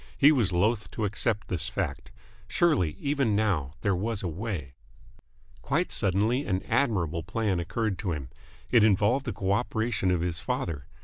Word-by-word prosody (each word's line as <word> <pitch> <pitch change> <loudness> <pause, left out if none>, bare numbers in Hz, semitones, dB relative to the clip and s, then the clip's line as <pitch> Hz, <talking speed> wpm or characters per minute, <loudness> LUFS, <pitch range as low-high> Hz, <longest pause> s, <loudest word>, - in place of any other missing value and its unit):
He 145 - +7
was 120 -11 +2
loth 105 +5 +1
to 110 - -1
accept 105 +1 -1
this 85 -2 -2
fact. - - -3 0.4
Surely, 125 - +2
even 140 -7 +1
now, 90 -10 0
there 100 -3 +1
was 105 +3 -2
a - - -1
way... 85 - -4 0.9
Quite 155 +8 0
suddenly 105 +7 +2
an 95 -5 -1
admirable 90 - 0
plan 100 +1 -1
occurred 100 +3 -2
to 95 -6 -2
him. 70 -6 -5 0.4
It 120 -4 +6
involved 110 +6 +3
the - - 0
co 95 -1 -2
operation 110 -2 0
of 90 -2 +1
his 85 -1 -2
father. 75 -7 -3
100 Hz, 165 wpm, -28 LUFS, 90-115 Hz, 0.9 s, He